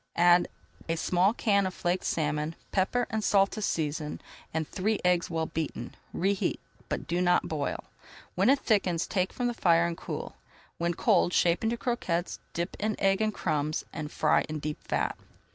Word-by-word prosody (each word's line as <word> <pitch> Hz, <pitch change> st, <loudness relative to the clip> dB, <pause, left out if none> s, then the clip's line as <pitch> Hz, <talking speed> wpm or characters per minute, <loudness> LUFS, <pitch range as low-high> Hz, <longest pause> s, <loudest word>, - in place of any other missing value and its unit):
Add 175 Hz, 0 st, +6 dB, 0.4 s
a 165 Hz, -, +2 dB
small 180 Hz, +4 st, +3 dB
can 200 Hz, -4 st, +2 dB
of 185 Hz, -, -6 dB
flaked 180 Hz, +1 st, -1 dB
salmon, 150 Hz, 0 st, -1 dB, 0.2 s
pepper 220 Hz, +6 st, +1 dB
and 220 Hz, -1 st, -1 dB
salt 195 Hz, -1 st, +4 dB
to 215 Hz, -, -5 dB
season, 150 Hz, -5 st, -2 dB, 0.3 s
and 160 Hz, -1 st, -2 dB
three 210 Hz, +3 st, -1 dB
eggs 180 Hz, -1 st, +3 dB
well 160 Hz, -1 st, -1 dB
beaten. 155 Hz, -7 st, -4 dB, 0.2 s
Reheat, 195 Hz, +2 st, 0 dB, 0.3 s
but -, -, -2 dB
do 175 Hz, +1 st, 0 dB
not 175 Hz, 0 st, +3 dB
boil. 150 Hz, -3 st, -2 dB, 0.5 s
When 195 Hz, +6 st, +3 dB
it 275 Hz, -, +6 dB
thickens, 195 Hz, -9 st, +1 dB
take 185 Hz, -1 st, 0 dB
from 245 Hz, -, -3 dB
the 240 Hz, -, +1 dB
fire, 170 Hz, -6 st, +4 dB
and 170 Hz, 0 st, -2 dB
cool. -, -, -6 dB, 0.4 s
When 170 Hz, 0 st, 0 dB
cold, 175 Hz, -, +3 dB
shape 170 Hz, +3 st, +3 dB
into 230 Hz, +1 st, +1 dB
croquettes, 185 Hz, -9 st, -2 dB, 0.2 s
dip 170 Hz, +2 st, -2 dB
in 215 Hz, 0 st, 0 dB
egg 195 Hz, +1 st, +3 dB
and 215 Hz, 0 st, +2 dB
crumbs, 155 Hz, -5 st, -1 dB
and 155 Hz, -2 st, -5 dB
fry -, -, +3 dB
in 155 Hz, -, -3 dB
deep 150 Hz, 0 st, -5 dB
fat. -, -, -1 dB
175 Hz, 180 wpm, -29 LUFS, 160-200 Hz, 0.5 s, Add